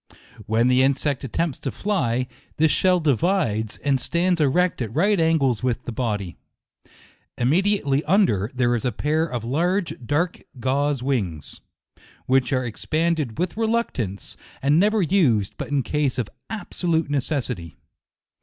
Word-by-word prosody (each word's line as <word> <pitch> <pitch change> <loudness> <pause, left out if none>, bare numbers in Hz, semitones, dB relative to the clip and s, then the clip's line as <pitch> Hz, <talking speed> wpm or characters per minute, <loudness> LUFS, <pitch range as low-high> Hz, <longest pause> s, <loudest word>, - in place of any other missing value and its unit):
When 115 +2 +2
the 125 0 +4
insect 140 +1 +1
attempts 145 +3 -2
to 135 - -3
fly, 130 - 0 0.3
this 160 0 +4
shell 185 -1 +3
divides, 145 - 0
and 140 -2 +2
stands 170 +4 0
erect 170 +3 +2
at 110 -3 -3
right 200 +5 +3
angles 140 -8 +2
with 125 -1 -1
the - - -4
body. 105 -6 -3 1.0
Imme 135 +9 +3
diately 170 -9 +1
under, 155 - +3
there 125 -1 +2
is 120 - -1
a 125 - 0
pair 155 +8 0
of 120 -6 -4
large, 170 - 0
dark 155 +8 -1 0.2
gauze 135 +1 0
wings, 95 - -3 0.6
which 130 +1 +2
are 130 -2 +1
expanded 155 +1 -1
with 180 0 -1
reluc 230 +1 0
tance, 100 -5 -5 0.2
and 145 +4 +3
never 210 +1 +3
used 140 - +2
but - - -3
in 145 -2 0
cases 145 +1 -1
of 120 -5 -2 0.2
absolute 170 -7 -1
necessity. 125 - -2
140 Hz, 145 wpm, -23 LUFS, 120-170 Hz, 1.0 s, the